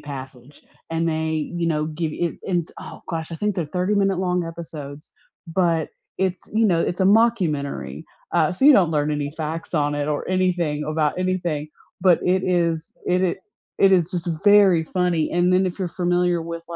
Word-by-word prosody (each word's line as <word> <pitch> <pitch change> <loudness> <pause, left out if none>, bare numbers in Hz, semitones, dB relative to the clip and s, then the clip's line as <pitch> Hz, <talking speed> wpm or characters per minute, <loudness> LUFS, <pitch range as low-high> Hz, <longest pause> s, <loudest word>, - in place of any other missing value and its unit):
Passage. 135 -1 -10 0.3
And 165 0 0
they, 160 -1 -2
you 170 -1 -1
know, 155 -2 0
give 155 0 -3
it 170 +1 -2 0.4
oh - - -10
gosh, 165 0 -4
I - - -4
think 210 +3 -1
they're 175 -4 -2
thirty-minute-long 185 0 0
episodes, 155 -3 -8 0.4
but 165 -2 0 0.3
it's, 190 -1 -1
you 220 +1 +3
know, 175 -5 +2
it's 180 - -2
a - - +4
mockumentary, 190 -11 +1 0.3
uh, 165 -3 +2
so 185 - -1
you 300 - +10
don't 180 -7 +4
learn 150 -1 0
any 145 -1 -2
facts 160 +1 -5
on 145 -1 +1
it 145 0 -2
or 150 +3 -2
anything 175 -5 0
about 155 +1 0
anything, 175 -5 -1 0.3
But 180 -2 +4
it 185 +1 +2
is 170 -3 0
it 180 +1 +2
i 180 -2 +1 0.4
it 195 - +5
is 175 -2 +3
just 175 -1 -2 0.2
very 200 -5 +6
funny. 175 -2 0
And 175 +1 +2
then 185 +1 +3
if 180 - -5
you're 185 -2 -2
familiar 175 0 0
with 170 0 -6
170 Hz, 180 wpm, -22 LUFS, 155-185 Hz, 0.4 s, you